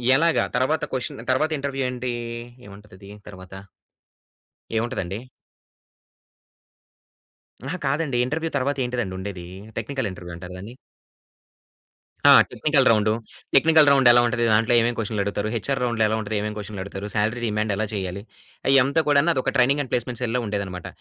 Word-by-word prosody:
ఎలాగ? 165 +3 +3 0.2
తరువాత 130 +5 +1
క్వెషన్, 125 -3 -4
తరువాత 155 +5 +1
ఇంటర్‌‌‌‌‌‌‌‌వ్యూ 135 -1 -2
ఏంటి? 125 0 -4 0.5
ఏమంటదది 100 -1 -14 0.2
తరువాత? 95 -1 -11 1.2
ఏముంటదండి? 100 -4 -3 2.4
అహా! 150 +7 -4
కాదండి 140 -2 0
ఇంటర్‌వ్యూ 160 +5 -2
తరువాత 140 +1 0
ఏంటిదండి 120 -7 -3
ఉండేది? 95 -2 -6 0.3
టెక్నికల్ 115 -1 -3
ఇంటర్‌వ్యూ 90 -2 -9
అంటారు 90 +1 -9
దాన్ని. 105 +7 -9 1.6
ఆ! - - +10 0.2
టెక్నికల్ 145 -4 +2
రౌండు, 110 -1 +3 0.4
టెక్నికల్ 155 +1 +6
రౌండెలా 120 -3 +6
ఉంటది? 120 0 -1
దాంట్లో 115 +3 +3
ఏమేం 115 +1 +1
క్వెషనులడుగుతారు? 105 -1 -2
హెచ్‌ఆర్ 135 +4 -1
రౌండ్‌లో 115 -2 0
ఎలా 110 - 0
ఉంటది? 110 +1 -4
ఏమేం 105 0 -3
క్వెషన్‌లడుగుతారు? 100 -1 -6
శాలరీ 110 +3 0
రిమాండ్ 105 0 -1
ఎలా 110 +2 -1
చేయాలి? 95 -1 -4 0.5
అయ్యంత 135 +3 +4
కూడాను 145 +2 +4
అది 130 - 0
ఒక - - 0
ట్రైనింగ్ 135 +3 +3
అండ్ 130 - -12
ప్లేస్‌మెంట్ 120 0 -2
సెల్‌లో 125 +1 0
ఉండేదన్నమాట. 100 -4 -4
120 Hz, 135 wpm, -23 LUFS, 100-135 Hz, 2.4 s, ఆ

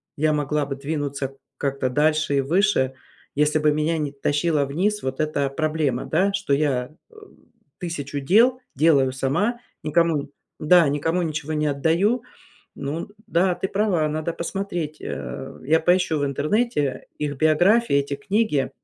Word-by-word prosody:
я 155 +1 +2
могла 150 0 0
бы 140 0 -4
двинуться 140 -2 -3 0.2
как-то 140 -2 -1
дальше 155 +1 +2
и - - +3
выше, 165 -2 +2 0.4
если 150 +2 +2
бы 150 0 +3
меня 155 +2 0
не 150 -2 -2
тащила 145 +1 +1
вниз 190 +10 -1
вот 130 0 -3
эта 150 -3 0
проблема, 150 -3 -1
да, 190 +5 +2
что 200 -7 -1
я, 140 -3 0 0.2
э, 460 - -22 0.6
1000 145 -5 -4
дел 230 - +4 0.2
делаю 140 -3 +4
сама, 165 - 0 0.2
никому 155 -2 +1 0.3
да, 170 +1 +5
никому 165 +5 0
ничего 155 -1 -3
не 150 0 0
отдаю. 165 - +1 0.5
Ну, 145 +4 -4 0.2
да, 180 +1 +2
ты 190 - -2
права, 190 -6 +1
надо 155 +2 -2
посмотреть. 170 -3 -4
Э, 135 0 -6
я 155 +5 +3
поищу 175 -2 +2
в - - -1
интернете 145 - -1
их 145 -1 -3
биографии, 175 - +3
эти 140 0 +1
книги 195 - 0
155 Hz, 145 wpm, -23 LUFS, 140-175 Hz, 0.6 s, да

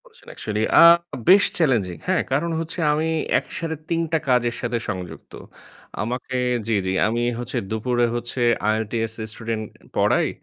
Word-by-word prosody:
করেছেন - - -21
actually 105 +1 -2 0.2
আ - - +10 0.5
বেশ 195 +2 +8
challenging. 115 - +1
হ্যাঁ, - - +2
কারণ 155 +6 0
হচ্ছে 165 +2 -5
আমি 155 +2 0 0.3
একসাথে 165 -1 -5
৩ 165 0 +1
টা 160 - +3
কাজের 120 -2 +2
সাথে 120 - -1
সংযুক্ত। 90 -3 -6 0.7
আমাকে 125 +3 -3 0.3
জ্বি, 115 - +1
জি 95 - 0
আমি 120 +2 -1 0.2
হচ্ছে 120 +1 -4
দুপুরে 120 +2 +1
হচ্ছে 120 +1 -4 0.3
IELTS 110 +1 -2 0.2
স্টুডেন্ট 110 0 -4 0.3
পড়াই। - - +3
120 Hz, 145 wpm, -22 LUFS, 110-145 Hz, 0.7 s, আ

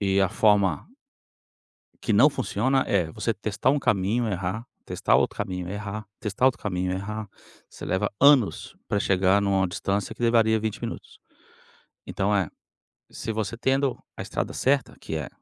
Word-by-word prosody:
E 100 -1 +2
a 95 - +3
forma 105 -3 +2 1.2
que 110 - 0
não 130 +9 +6
funciona 130 +1 0
é 90 -5 +1
você 115 +6 -2
testar 105 +4 0
um 145 - +2
caminho, 110 +1 +1
errar, 95 +4 -3 0.2
testar - - +2
outro - - +1
caminho, 90 -2 -4
errar, 105 +1 -5
testar 105 +4 +1
outro 130 - +2
caminho, 90 -2 -1
errar. 105 +2 -4 0.4
Você - - -10
leva 100 +2 0
anos 135 - +4
pra 100 - 0
chegar 95 +1 +3
numa 95 -1 +2
distância 100 +4 -2
que 120 - -9
levaria 110 -2 +3
20 110 -1 -3
minutos. - - -7 0.9
Então, 100 +1 0
eh, 90 -6 0 0.6
se 115 - -5
você 110 +1 -3
tendo 135 +1 +1 0.2
a - - -5
estrada - - -3
certa, 135 -1 +1
que - - -6
é - - -3
105 Hz, 160 wpm, -25 LUFS, 95-115 Hz, 1.2 s, não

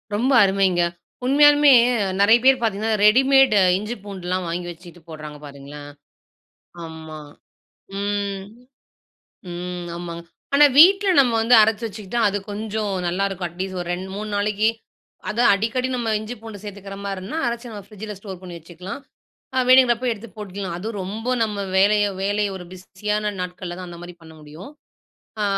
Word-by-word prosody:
ரொம்ப 245 +6 +1
அருமைங்க. 190 -2 +2 0.4
உண்மையாலுமே 290 +1 +6 0.5
நெறைய 220 +4 +6
பேர் 265 -2 +5
பாத்தீங்கன்னா 220 0 0
ரெடிமேட் 265 +2 +5 0.2
இஞ்சி 210 +4 -5
பூண்டுலாம் 185 -2 -4
வாங்கி 175 +1 -4
வெச்சுக்கிட்டு 175 0 -12
போடுறாங்க 155 -1 -9
பாருங்களேன். 145 +1 -10 0.9
ஆமா. 160 -1 -9 0.8
ம். 200 -1 -2 1.1
ம், 175 0 -6
ஆமாங்க. 170 -1 -7 0.3
ஆனா 295 +1 +8
வீட்ல 390 +4 +7
நம்ம 250 -3 +2
வந்து 235 +2 +4
அரச்சு 220 +1 +1
வெச்சுக்கிட்டா 215 +2 -4
அது 205 +1 -2
கொஞ்சம் 210 0 -3
நல்லா 180 +3 0
இருக்கும். 185 -2 -4
அட்லீஸ்ட் 185 +2 -5
ஒரு 175 - -6
2 190 +2 -7
3 210 +1 -5
நாளைக்கி, 210 +1 +1 0.6
அதும் 235 +3 +3
அடிக்கடி 230 +5 -1
நம்ம 235 -2 -3
இஞ்சி 220 +3 -6
பூண்டு 215 -3 -10
சேர்த்துக்கிற 200 -1 -8
மாரினா, 195 +8 -5
அரச்சு 235 0 -5
நம்ம 205 - -8
பிரிட்ஜ்ல 210 0 -8
ஸ்டோர் 195 -3 -9
பண்ணி 180 -2 -9
வெச்சுக்கலாம். 180 - -9 0.6
அ - - +3
வேணுங்கறப்ப 255 -1 +5
எடுத்து 225 +2 -9
போட்டுக்கலாம். 195 -3 -6
அதும் 215 +3 -5
ரொம்ப 215 +6 -6
நம்ம 210 -2 -2 0.2
வேலைய, 205 +2 +4 0.2
வேலைய 205 +1 0
ஒரு 180 - -9
பிஸியான 210 +3 -3
நாட்கள்ல 180 -1 -6
தான் 180 -1 -8
அந்த 170 -1 -10
மாரி 175 0 -10
பண்ண 160 - -14
முடியும். 155 - -11 0.7
அ - - +1
200 Hz, 150 wpm, -22 LUFS, 180-225 Hz, 1.1 s, ஆனா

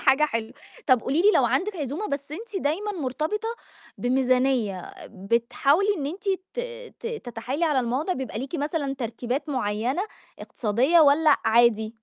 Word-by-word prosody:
حاجة 270 +3 +4
حلوة، 230 -6 -3 0.3
طب 255 -3 +5
قولي 280 +9 0
لي 415 - +7
لو - - +4
عندِك 410 +1 0
عزومة، 300 - -3
بس 280 +1 -4
أنتِ 420 +4 -6
دايمًا 385 +9 -1
مرتبطة 320 - -2 0.5
بميزانية، 250 -6 +1 0.2
بتحاولي 235 - +1
إن 280 - -2
أنتِ 390 +6 -5 0.3
ت 485 - -1 0.4
ت - - -6
تتحايلي 265 - -3
على 295 -5 +2
الموضع، 255 +9 -1
بيبقى 265 -8 -4
ليكِ 265 +6 -6
مثلًا 290 -2 -1
ترتيبات 250 +3 -3
معيّنة 245 - -1 0.4
اقتصادية، 250 +10 +2
والّا 295 0 +5
عادي؟ 225 -1 +3
275 Hz, 145 wpm, -25 LUFS, 240-320 Hz, 0.5 s, لي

